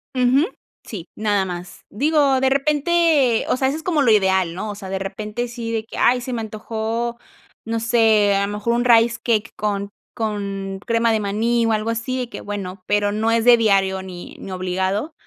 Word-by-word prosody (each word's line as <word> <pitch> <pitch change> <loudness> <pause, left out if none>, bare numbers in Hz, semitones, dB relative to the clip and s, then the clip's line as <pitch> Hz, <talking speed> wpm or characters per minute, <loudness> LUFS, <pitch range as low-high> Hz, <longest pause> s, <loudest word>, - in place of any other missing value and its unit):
Ujú. 255 +5 +3 0.4
Sí, 185 -6 -8
nada 205 -2 +1
más. 180 -1 -7
Digo, 285 +2 +2
de 265 - +3
repente, 295 -2 +2
o - - +2
sea, 265 - +1
eso 275 +3 -1
es 320 - -9
como 325 -4 +1
lo 245 -5 +4
ideal, 190 -4 +2
¿no? 210 +3 -4
O - - -7
sea, 195 -2 -9
de 190 - -2
repente 210 +5 -4
sí 235 -1 -6
de 225 -1 -1
que, - - -10
ay, 245 +1 +3
se 250 +1 -5
me 235 - -2
antojó, 225 +2 -3 0.5
no 225 0 -2
sé, 220 -3 +3
a 200 0 +1
lo 205 - -5
mejor 210 +3 -1
un 240 +1 0
Rice 230 -1 +5
Cake 225 -2 0
con 200 -1 -2 0.3
con 200 -3 -3
crema 230 0 +2
de 220 - 0
maní 225 +4 +1
o 225 - +1
algo 215 +1 0
así 230 +3 -3
de 250 -2 -4
que, - - -8
bueno. 195 -2 -6
Pero 205 0 +1
no 220 +2 0
es 230 0 +1
de 245 -1 +8
diario 195 -4 +2
ni 180 -2 -9
ni 195 - -8
obligado, 190 - -2
220 Hz, 210 wpm, -21 LUFS, 200-240 Hz, 0.5 s, de